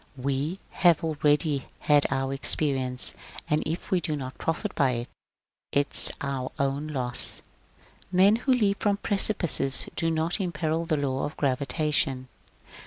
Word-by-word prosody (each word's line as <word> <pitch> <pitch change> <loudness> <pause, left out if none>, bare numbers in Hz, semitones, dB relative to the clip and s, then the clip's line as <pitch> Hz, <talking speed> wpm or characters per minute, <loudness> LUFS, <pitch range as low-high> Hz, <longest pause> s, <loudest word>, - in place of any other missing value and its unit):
We 140 +6 -3
have 170 -3 +2
already 150 -2 0 0.2
had 145 -1 +3
our 135 0 -2
experience, 135 -2 +3 0.3
and 150 +1 +1
if 165 +3 -5
we 185 -2 +1
do 155 -2 -2
not 130 -2 -8
profit 170 +6 -3
by 135 -4 +1
it, 120 0 -5 0.4
\ - - -63
is 140 - +4
our 135 -2 -4
own 140 +1 -2
loss. 125 -5 +3 0.7
Men 195 +4 +4
who 260 +3 -1
leap 210 -6 +1
from 205 -1 +1
precipices 195 -10 +2
do 165 - -1
not 165 +4 -1
imperil 165 -2 -2
the 155 -2 -1
law 135 -2 -2
of 145 - -8
gravitation. 140 -1 -1
150 Hz, 145 wpm, -26 LUFS, 135-170 Hz, 0.7 s, is